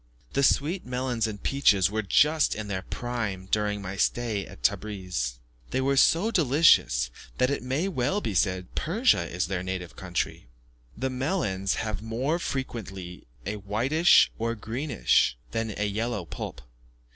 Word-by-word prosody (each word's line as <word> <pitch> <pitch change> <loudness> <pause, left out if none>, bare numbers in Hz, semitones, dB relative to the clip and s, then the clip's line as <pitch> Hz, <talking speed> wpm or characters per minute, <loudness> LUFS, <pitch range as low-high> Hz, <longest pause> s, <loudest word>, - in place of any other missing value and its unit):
The - - +2
sweet 155 +6 +2
melons 125 -2 -1
and 105 -2 -7
peaches 100 -9 +3
were 110 +1 0
just 150 +9 +3
in 110 -1 -5
their 95 -2 -2
prime 110 -4 -4
during 105 -1 0
my 95 +1 -5
stay 110 -2 0
at - - -14
Tebris. 90 - -1 0.3
They - - -1
were 135 +1 +2
so 170 +10 +4
delicious, 135 - +4 0.3
that 130 +1 +2
it 140 - -1
may 135 +9 -1
well 175 +2 0
be 110 - -3
said 95 -1 0
Persia 220 +11 +2
is 90 -1 -1
their 90 +1 -2
native 90 -2 -5
country. 90 -8 -3 0.5
The 130 +3 -1
melons 125 - -1
have 110 -3 -3
more 125 +9 -1
frequently 100 - -5 0.2
a 105 +3 -3
whitish, 120 - +4
or 115 +1 -1
greenish, 115 - +1
than 115 -2 -2
a 105 - 0
yellow 105 -1 -2
pulp. 65 - -7
110 Hz, 150 wpm, -27 LUFS, 95-135 Hz, 0.5 s, so